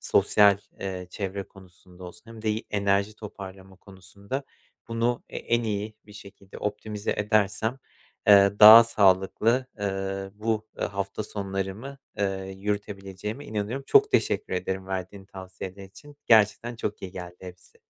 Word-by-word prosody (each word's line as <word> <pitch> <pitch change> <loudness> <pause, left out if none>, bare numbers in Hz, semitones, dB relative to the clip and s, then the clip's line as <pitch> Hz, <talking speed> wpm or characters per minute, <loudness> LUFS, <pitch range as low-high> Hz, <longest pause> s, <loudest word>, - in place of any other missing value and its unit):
sosyal, 100 -2 +4 0.2
eee, 95 -2 -5
çevre 100 0 -4
konusunda 90 -1 -16
olsun 90 - -11
hem 115 -1 -11
de 110 - +1
i 110 +1 -3
enerji 100 +1 +1
toparlama 95 -2 -10
konusunda 100 +7 -8 0.4
bunu 115 +1 -1
e - - -7
en 120 0 0
iyi 105 0 -3
bir 105 - -14
şekilde 100 -1 -13
optimize 105 0 -3
edersem, 110 +3 +1 0.5
eee, 100 -1 +7
daha 110 +2 +11
sağlıklı, 110 +4 +2
ııı, 95 -1 -3
bu, 110 0 -2
eee, - - 0
hafta 100 +1 -4
sonlarımı, 100 +7 -5 0.2
eee, 95 -1 -2
yürütebileceğime 100 +3 -5
inanıyorum. 110 +6 -4
Çok 420 0 +5
teşekkür 430 - 0
ederim 95 0 -3
verdiğin 95 +1 -5
tavsiyeler 95 0 -9
için. 145 +10 -15
Gerçekten 110 +2 +3
çok 105 -2 -4
iyi 95 - -6
geldi 90 -1 -8
hepsi. 90 -1 -13
100 Hz, 135 wpm, -26 LUFS, 95-110 Hz, 0.5 s, daha